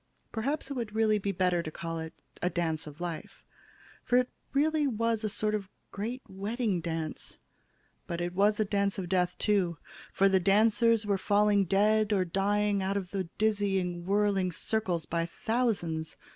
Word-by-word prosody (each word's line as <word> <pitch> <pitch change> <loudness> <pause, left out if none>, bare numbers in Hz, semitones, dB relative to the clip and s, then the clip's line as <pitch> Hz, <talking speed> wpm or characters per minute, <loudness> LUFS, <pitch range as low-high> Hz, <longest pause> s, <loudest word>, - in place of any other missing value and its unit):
Perhaps 275 +5 -2
it - - 0
would 230 -5 -4
really 215 -1 +3
be 200 0 -1
better 180 -2 +1
to 160 - -5
call 165 +1 -5
it 160 0 -5 0.3
a 180 - +1
'dance 165 -3 -2
of 150 +1 -10
life,' 175 -2 -6 0.6
for 245 - +3
it 250 0 +1 0.2
really 300 +1 +2
was 225 -3 0
sort 215 +1 0
of 210 -2 -1
a - - -29 0.2
great 235 +6 -4
wedding 205 +1 -2
dance. 160 -2 -4 0.7
But 170 - -3
it 175 0 -2
was 205 +3 +3
a 215 - +3
dance 200 -1 0
of 185 -2 -3
death, 180 -1 +1
too, 190 -6 +1 0.3
for 195 - +4
the 190 -1 +4
dancers 220 +3 +3
were 200 -2 +1
falling 205 0 +3
dead 210 +3 +3
or 190 -2 +2
dying 200 +2 +1
out 195 +1 0
of 185 -3 -5
the 195 -2 -2
dizzying 195 -5 0
whirly 200 -2 +2
circles 180 -3 -1
by 170 0 -1
thousands. 180 -8 -1
200 Hz, 170 wpm, -30 LUFS, 175-215 Hz, 0.7 s, for